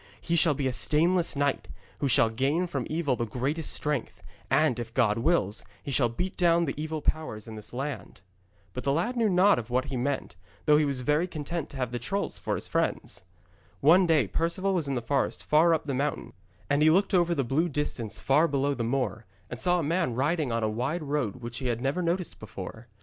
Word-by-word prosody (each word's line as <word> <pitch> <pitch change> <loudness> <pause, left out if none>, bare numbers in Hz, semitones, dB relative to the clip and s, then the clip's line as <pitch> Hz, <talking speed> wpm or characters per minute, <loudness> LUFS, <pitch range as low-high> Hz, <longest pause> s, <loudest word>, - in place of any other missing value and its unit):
'He 170 - -1
shall 160 -3 +5
be 140 - -2
a 130 - 0
stainless 170 +6 +1
knight, 140 0 0 0.3
who 140 - 0
shall 115 -3 +4
gain 140 +9 +1
from 140 -8 -4
evil 155 -4 0
the 120 -1 -3
greatest 140 +8 -1
strength, 150 -5 -3 0.3
and, 145 -6 +2
if 115 0 -7
God 115 -4 +2
wills, 115 - +1 0.2
he 140 - -5
shall 125 -2 +3
beat 180 +11 -4
down 170 -1 +3
the 140 - -2
evil 155 0 -4
powers 135 -10 -2
in 110 - -8
this 110 -1 -7
land.' 135 -6 -5 0.5
But 125 - -5
the 140 - +1
lad 180 - 0
knew 230 -3 +2
not 180 - +3
what 125 +1 +1
he - - -1
meant, 135 -7 -2 0.3
though 150 -1 +6
he 150 - +3
was 140 -3 -2
very 150 +6 +1
content 155 -1 -5
to 140 - -9
have 125 -3 -2
the 120 - -3
trolls 195 - -3
for - - -2
his - - -4
friends. - - -2 0.6
One 175 +6 +5
day 155 -7 +4
Perceval 170 - -1
was 170 -6 0
in 135 - -1
the 120 - -3
forest 135 +3 -1
far 160 +3 +4
up 160 -1 +1
the 140 - -2
mountain, 140 +3 -2 0.3
and 145 +1 +1
he 155 - +6
looked 190 +6 +3
over 175 -2 +3
the 140 - +1
blue 150 +8 +1
distance 135 -7 -2
far 150 +5 +3
below 140 -2 0
across 140 - -3
the - - 0
moor, 115 -4 -2 0.3
and - - -5
saw 180 0 +3
a 170 - -1
man 150 -5 0
riding 145 +1 0
on 115 -1 -1
a - - +2
wide 125 +10 -2
road 140 -7 -1
which 120 -2 -6
he 130 - -3
had 120 -1 -1
never 135 +8 -1
noticed 175 +1 -2
before. 110 +3 -8
145 Hz, 225 wpm, -28 LUFS, 125-165 Hz, 0.6 s, though